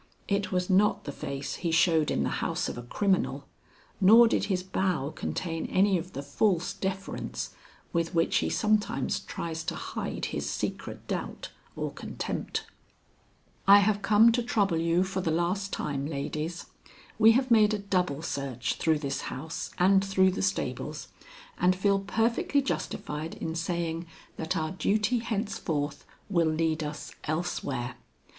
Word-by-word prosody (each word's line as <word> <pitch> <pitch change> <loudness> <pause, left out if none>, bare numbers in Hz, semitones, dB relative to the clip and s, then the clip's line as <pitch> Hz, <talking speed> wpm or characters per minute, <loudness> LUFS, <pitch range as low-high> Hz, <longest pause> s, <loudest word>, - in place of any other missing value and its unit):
It 200 -1 0
was 180 -1 0
not 205 +1 +3
the 145 - -5
face 140 0 -5
he 170 - -2
showed 165 -2 +3
in - - +1
the - - 0
house - - -1
of - - -4
a 120 - -6
criminal, 190 - 0 0.5
nor 225 +5 +8
did - - +1
his 185 -3 -1
bow 185 -6 -1
contain 165 +1 -3
any 195 +1 +3
of 180 +3 -9
the 140 - -5
false 175 +5 +1
deference 195 0 -4 0.4
with 170 +1 0
which 165 0 +3
he - - +1
sometimes 215 0 +1
tries 160 -1 -5
to - - -2
hide - - -4
his - - -2
secret - - -4
doubt - - -4 0.2
or - - -3
contempt. - - -4 1.0
"I 200 +1 +10
have 205 0 +3
come 215 +3 +6
to 245 +1 +1
trouble 205 -7 +1
you 170 +2 +2
for 190 0 -2
the 170 - -1
last 180 +5 0
time, 140 -2 -2
ladies. 155 +3 -4 0.5
We 225 +1 +8
have 255 +1 +1
made 215 -2 +6
a - - -1
double 180 -7 -1
search 140 -6 -2
through 160 -1 +2
this 140 -2 -3
house 155 +5 -5
and 195 +2 +5
through 190 -1 +3
the 185 - -3
stables, 190 0 -2 0.5
and 180 +1 +4
feel 195 +1 +2
perfectly 230 +7 +1
justified 155 - -3
in 160 - -4
saying 170 0 -2 0.3
that 160 +3 -2
our 155 -1 -1
duty 210 +5 +1
henceforth 170 -10 -2 0.2
will 170 -5 +2
lead 160 0 0
us 150 0 -6
elsewhere. 145 -6 -2
180 Hz, 155 wpm, -28 LUFS, 160-200 Hz, 1.0 s, I